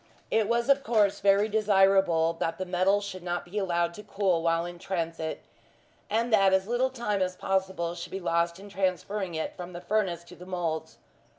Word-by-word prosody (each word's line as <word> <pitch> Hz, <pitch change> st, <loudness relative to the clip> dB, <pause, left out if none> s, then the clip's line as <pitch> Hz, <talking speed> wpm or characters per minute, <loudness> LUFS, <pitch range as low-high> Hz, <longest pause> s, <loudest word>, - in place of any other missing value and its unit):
It 220 Hz, -1 st, +2 dB
was, 235 Hz, +1 st, +1 dB
of 275 Hz, 0 st, +4 dB
course, 215 Hz, -5 st, +2 dB
very 200 Hz, +1 st, +4 dB
desirable 195 Hz, -6 st, +3 dB
that 165 Hz, -, -1 dB
the 185 Hz, -, -3 dB
metal 185 Hz, +3 st, +2 dB
should 195 Hz, -2 st, -6 dB
not 175 Hz, 0 st, -3 dB
be 190 Hz, +4 st, -3 dB
allowed 170 Hz, -3 st, 0 dB
to 210 Hz, -, -9 dB
cool 195 Hz, -4 st, 0 dB
while 165 Hz, 0 st, +1 dB
in 175 Hz, 0 st, -8 dB
transit, 165 Hz, -3 st, -3 dB, 0.7 s
and 230 Hz, +2 st, 0 dB
that 195 Hz, -2 st, +5 dB
as 190 Hz, 0 st, +3 dB
little 240 Hz, +4 st, +1 dB
time 235 Hz, -6 st, -2 dB
as 185 Hz, 0 st, 0 dB
possible 190 Hz, -3 st, -1 dB
should 170 Hz, -1 st, -8 dB
be 195 Hz, -, -4 dB
lost 170 Hz, 0 st, 0 dB
in 200 Hz, -, -11 dB
transferring 190 Hz, -1 st, -2 dB
it 160 Hz, -, -3 dB
from 180 Hz, 0 st, -8 dB
the 175 Hz, -, -6 dB
furnace 180 Hz, -3 st, 0 dB
to 175 Hz, +1 st, -14 dB
the 180 Hz, +1 st, -12 dB
moulds. 170 Hz, -4 st, -3 dB
190 Hz, 195 wpm, -28 LUFS, 175-205 Hz, 0.7 s, that